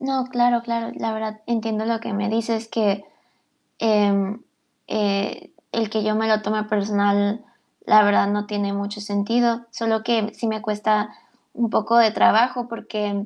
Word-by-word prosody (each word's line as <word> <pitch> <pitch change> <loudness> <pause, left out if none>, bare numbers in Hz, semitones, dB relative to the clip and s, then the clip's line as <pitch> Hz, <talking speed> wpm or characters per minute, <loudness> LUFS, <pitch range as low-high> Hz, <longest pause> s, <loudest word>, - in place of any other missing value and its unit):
No, 265 -1 -1
claro, 245 -2 +2
claro. 230 -1 -3
La 225 - -2
verdad, 220 0 -5
entiendo 225 -2 -1
lo 230 0 -1
que 230 - -6
me 200 0 -1
dices, 225 0 -1
que, 205 -3 0 0.8
em, 205 -1 +2 0.5
eh, 200 -2 -2 0.2
el 225 -2 -1
que 215 0 -1
yo 215 0 +1
me 220 +1 +1
lo 215 -1 +3
tome 215 0 -1
personal, 205 +1 +1 0.4
la 215 0 +7
verdad, 205 -1 +4
no 205 0 -1
tiene 205 -1 -2
mucho 200 +1 -4
sentido. 230 +4 0
Sólo, 225 -1 -1
que 225 -2 0
sí 230 - -4
me 220 -1 -2
cuesta 210 0 0 0.4
un 235 -1 -1
poco 220 +2 +2
de 225 -2 +6
trabajo, 240 +3 +3
porque 210 -3 -4
215 Hz, 165 wpm, -22 LUFS, 205-230 Hz, 0.8 s, la